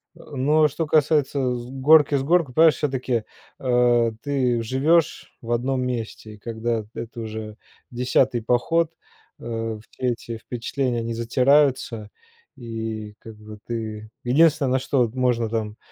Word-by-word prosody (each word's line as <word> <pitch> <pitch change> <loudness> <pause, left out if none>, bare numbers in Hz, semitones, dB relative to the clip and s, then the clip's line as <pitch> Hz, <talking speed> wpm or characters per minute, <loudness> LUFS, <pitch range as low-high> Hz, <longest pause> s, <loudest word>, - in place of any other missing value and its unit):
Э, - - -15
но 150 +4 +3
что 155 +3 -3
касается 145 -4 +2
с 120 0 -6
горки 145 +2 +5
в 135 - 0
горку, 165 -5 +2
понимаешь, 160 -1 +6
всё-таки, 130 -5 -1 0.4
э, 120 -2 +3
ты 130 -4 0
живёшь 145 +8 +1
в 120 -1 -6
одном 130 +2 0
месте. 115 -3 -5
Когда 115 -1 -2
это 115 0 -7
уже 110 -1 -6 0.3
10-й 125 0 +1
поход, 160 +8 +1 0.5
э, 115 -2 -4
все - - -13
эти 115 -1 -6
впечатления, 120 +2 -3
они 115 0 -3
затираются, 125 -1 +2 0.5
и 110 -3 -6
как 110 -1 -11
бы 105 0 -12
ты 110 -2 -5
Единственное, 140 0 +3
на 130 - +2
что 130 -3 +1
можно 125 -3 +1
там 110 -1 -3
125 Hz, 135 wpm, -23 LUFS, 115-135 Hz, 0.5 s, понимаешь